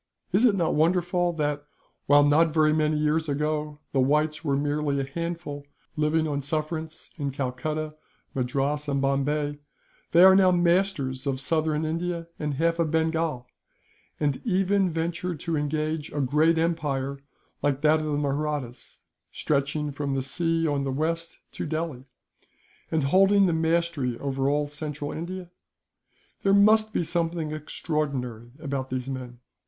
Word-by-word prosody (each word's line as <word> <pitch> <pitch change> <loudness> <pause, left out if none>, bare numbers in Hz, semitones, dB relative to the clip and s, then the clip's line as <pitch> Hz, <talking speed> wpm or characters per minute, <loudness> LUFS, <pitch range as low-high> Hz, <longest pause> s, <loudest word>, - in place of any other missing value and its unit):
"Is 200 +7 +4
it 220 -5 +5
not 170 -4 +1
wonderful 175 +2 +2
that, 150 -2 -1 0.4
while 145 0 +6
not 150 +3 +5
very 155 -1 +3
many 155 0 +1
years 155 +1 +1
ago 150 +1 -1
the 135 - +1
Whites 150 +4 +1
were 140 -3 +1
merely 145 0 0
a - - 0
handful, 155 -1 -5 0.3
living 155 +1 +1
on 145 -1 -2
sufferance 155 +2 -3
in 145 -3 -2
Calcutta, 145 +4 -3 0.4
Madras, 140 +3 -1
and 140 -1 0
Bombay, 145 +2 0 0.5
they 170 +2 +7
are 190 0 +9
now 190 -1 +6
masters 175 -7 +1
of 135 -1 -1
southern 155 +2 0
India 170 +1 -2
and 150 -2 -2
half 165 +3 +1
of 165 -2 +2
Bengal; 160 -4 0 0.7
and 145 -3 0
even 195 -2 +2
venture 170 +2 -2
to 165 +2 -3
engage 155 +1 -2
a 145 - -3
great 150 +5 +3
empire 140 -5 -1 0.4
like 145 -1 0
that 155 +1 +4
of 155 - -3
the 145 -1 0
Mahrattas, 145 -3 -3 0.3
stretching 145 +1 -1
from 140 -1 -2
the 135 - -1
sea 165 +4 0
on 145 -2 0
the 135 - -2
west 165 +4 -2
to - - -5
Delhi, 155 -4 -3 0.8
and 160 -2 0
holding 195 +7 +5
the 175 - +2
mastery 160 -6 0
over 135 -1 -1
all 145 0 +1
central 150 -1 -5
India? 175 +2 -6 0.9
There 195 0 +4
must 215 +2 +5
be 175 - 0
something 165 -2 -1
extraordinary 140 -6 -3
about 140 -4 -3
these 130 0 -3
men. 125 -2 -6
150 Hz, 150 wpm, -26 LUFS, 140-165 Hz, 0.9 s, are